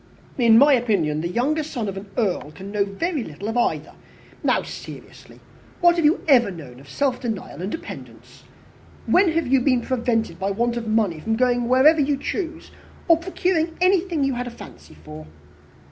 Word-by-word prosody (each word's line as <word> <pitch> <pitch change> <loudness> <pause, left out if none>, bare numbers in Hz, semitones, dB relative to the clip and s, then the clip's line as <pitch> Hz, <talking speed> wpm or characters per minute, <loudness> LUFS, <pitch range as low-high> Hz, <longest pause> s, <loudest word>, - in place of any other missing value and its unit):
"In 230 -2 +6
my 285 +3 +6
opinion, 195 - +1
the 170 - -2
younger 265 - 0
son 260 -8 -4
of 195 - -4
an 195 +1 -8
earl 195 -10 -1
can 195 +1 -9
know 205 -1 +1
very 285 - -3
little 160 +5 -8
of 225 - -4
either. 240 - -1 0.5
Now, - - +2
seriously, - - -11 0.4
what 345 -1 +5
have 335 -3 +1
you 305 +3 +3
ever 250 -7 +5
known 145 -9 -10
of 140 0 -16
self 260 - -1
denial 220 -7 -5
and 190 +3 -4
dependence? 325 - -10 0.6
When 365 -2 +3
have 330 -1 0
you 265 0 +2
been 255 -2 +2
prevented 230 -8 -1
by 195 +1 -1
want 235 +4 -1
of 235 -1 -4
money 215 -7 +1
from 225 +8 -1
going 245 0 +1
wherever 270 +6 +5
you 280 0 +1
chose 330 +3 -5 0.4
or 335 -2 +6
procuring 335 -1 -1
anything 365 -4 +2
you 275 -1 +1
had 245 0 -4
a - - -4
fancy 85 - -13
for?" 75 0 -10
245 Hz, 185 wpm, -22 LUFS, 200-300 Hz, 0.6 s, In